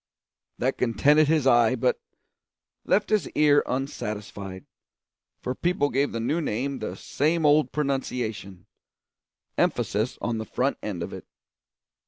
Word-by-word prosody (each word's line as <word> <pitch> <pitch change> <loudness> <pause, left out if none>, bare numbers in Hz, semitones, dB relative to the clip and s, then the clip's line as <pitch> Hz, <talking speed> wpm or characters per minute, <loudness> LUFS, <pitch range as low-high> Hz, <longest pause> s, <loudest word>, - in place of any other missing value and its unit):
That - - -1
contented 145 +6 +4
his 155 -3 +2
eye, 120 -1 +5
but 125 0 0 0.8
left 210 +1 +1
his 215 -2 +2
ear 145 -1 +5
unsatisfied, 105 -7 -5 0.8
for 125 - -1
people 155 -1 0
gave 140 +2 +1
the 115 - -3
new 150 +9 0
name 135 +1 -2
the - - -4
same 160 +3 0
old 150 +1 +4
pronunciation 125 -10 -3 0.9
emphasis 110 +5 0
on 115 -2 -2
the 110 - -4
front 135 +5 -1
end 95 -5 -4
of - - -6
it. - - -9
130 Hz, 130 wpm, -26 LUFS, 110-150 Hz, 0.9 s, eye